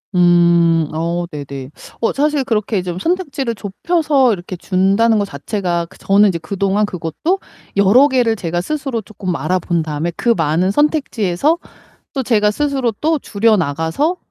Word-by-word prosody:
음. 170 Hz, -2 st, +4 dB
어 170 Hz, +2 st, -2 dB
네네. 140 Hz, -3 st, -7 dB, 0.3 s
어 230 Hz, -, +1 dB
사실 295 Hz, 0 st, +1 dB
그렇게 215 Hz, -5 st, -1 dB
좀 180 Hz, -1 st, -5 dB
선택지를 280 Hz, -, -2 dB
좁혀서 270 Hz, -, +1 dB
이렇게 185 Hz, -1 st, -6 dB
준다는 200 Hz, +5 st, +2 dB
거 205 Hz, -, 0 dB
자체가 175 Hz, +1 st, -3 dB
그 -, -, -17 dB
저는 200 Hz, +1 st, +4 dB
이제 175 Hz, -, -1 dB
그동안 195 Hz, +5 st, 0 dB
그것도 185 Hz, -, -2 dB, 0.4 s
여러 200 Hz, +8 st, +5 dB
개를 245 Hz, -5 st, +2 dB
제가 175 Hz, -3 st, -2 dB
스스로 270 Hz, -, -3 dB
쪼끔 190 Hz, -4 st, -5 dB
알아 185 Hz, +2 st, 0 dB
본 170 Hz, -1 st, -1 dB
다음에 155 Hz, +2 st, -3 dB
그 240 Hz, -, -1 dB
많은 165 Hz, +3 st, +1 dB
선택지에서 290 Hz, -, +1 dB, 0.6 s
또 270 Hz, -, -2 dB
제가 215 Hz, -4 st, +2 dB
스스로 270 Hz, -1 st, -1 dB
또 315 Hz, 0 st, +1 dB
줄여나가서 205 Hz, -, 0 dB
200 Hz, 320 characters per minute, -17 LUFS, 175-260 Hz, 0.6 s, 여러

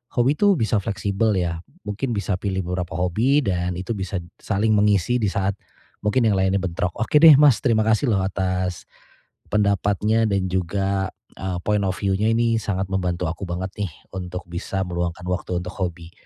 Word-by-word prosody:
hobi 125 Hz, +4 st, +3 dB
itu 205 Hz, +1 st, +4 dB
bisa 110 Hz, 0 st, +1 dB
fleksibel 100 Hz, +1 st, 0 dB
ya 85 Hz, -2 st, -1 dB, 0.3 s
mungkin 115 Hz, +5 st, -2 dB
bisa 100 Hz, -2 st, -1 dB
pilih 95 Hz, -1 st, -2 dB
beberapa 90 Hz, -1 st, -3 dB
hobi 110 Hz, -, +2 dB
dan 90 Hz, -6 st, -1 dB
itu 95 Hz, +5 st, -3 dB
bisa 95 Hz, -1 st, -3 dB, 0.2 s
saling 110 Hz, +1 st, +1 dB
mengisi 105 Hz, +2 st, +3 dB
di 105 Hz, -, +2 dB
saat, 100 Hz, 0 st, 0 dB, 0.5 s
mungkin 110 Hz, +4 st, +2 dB
yang 105 Hz, -, +3 dB
lainnya 95 Hz, +1 st, +2 dB
bentrok. 90 Hz, -1 st, -2 dB
Oke 115 Hz, +6 st, +2 dB
deh 155 Hz, -4 st, +10 dB
Mas 145 Hz, -6 st, +5 dB
terima 115 Hz, -5 st, +3 dB
kasih 110 Hz, +4 st, +2 dB
loh 100 Hz, -, +2 dB
atas, 95 Hz, -2 st, -2 dB, 0.7 s
pendapatnya 105 Hz, +2 st, +2 dB
dan 100 Hz, -2 st, 0 dB
juga, 95 Hz, +2 st, -1 dB, 0.3 s
eee, 95 Hz, -2 st, -2 dB
point 105 Hz, -1 st, +2 dB
of 95 Hz, 0 st, -1 dB
view-nya 100 Hz, +2 st, +1 dB
ini 115 Hz, 0 st, +2 dB
sangat 95 Hz, -1 st, -1 dB
membantu 90 Hz, -2 st, -1 dB
aku 85 Hz, +4 st, -5 dB
banget 90 Hz, +2 st, -4 dB
nih 100 Hz, -4 st, -1 dB, 0.2 s
untuk 90 Hz, 0 st, -5 dB
bisa 95 Hz, +2 st, -3 dB
meluangkan 85 Hz, 0 st, -3 dB
waktu 90 Hz, -1 st, -2 dB
untuk 90 Hz, 0 st, -6 dB
hobi. 85 Hz, -3 st, -4 dB
95 Hz, 175 wpm, -23 LUFS, 90-110 Hz, 0.7 s, deh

